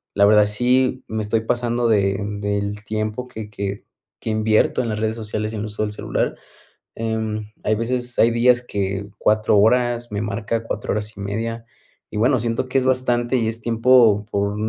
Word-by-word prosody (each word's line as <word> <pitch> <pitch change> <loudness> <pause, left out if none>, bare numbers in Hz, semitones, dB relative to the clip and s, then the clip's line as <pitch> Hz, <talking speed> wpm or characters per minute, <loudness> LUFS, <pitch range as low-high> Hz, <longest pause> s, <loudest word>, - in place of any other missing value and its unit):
la 100 - +5
verdad 105 0 +6
sí 125 +4 +1
me 110 0 -3
estoy 110 +1 0
pasando 120 0 0
de 100 -2 +2 0.2
del 100 0 -2
tiempo 110 +3 -3
que 110 -3 -8
que 100 -1 -5 0.4
que - - -4
invierto 110 +3 +2
en 115 - -3
las 105 0 -2
redes 110 0 -1
sociales 110 0 -3
en 105 - -4
el - - -3
uso 105 +1 -3
del 105 - -2
celular. - - -2 0.6
Em, 110 -1 -3
hay 110 - +2
veces, 120 +2 -2
hay 115 - +5
días 120 +1 +4
que 100 -2 -3
cuatro 110 0 +3
horas 120 +2 +2
me 100 0 -2
marca 110 +2 -2
cuatro - - -4
horas 105 +1 -4
y - - -7
media. 115 +3 -3 0.5
Y - - -5
bueno, 125 +4 +3
siento 115 +2 -1
que 135 - +1
es 130 - +2
bastante 125 -1 +1
y 115 -2 0
es 115 +1 -4
tiempo 115 -3 +4
por 100 0 0
110 Hz, 190 wpm, -21 LUFS, 105-120 Hz, 0.6 s, verdad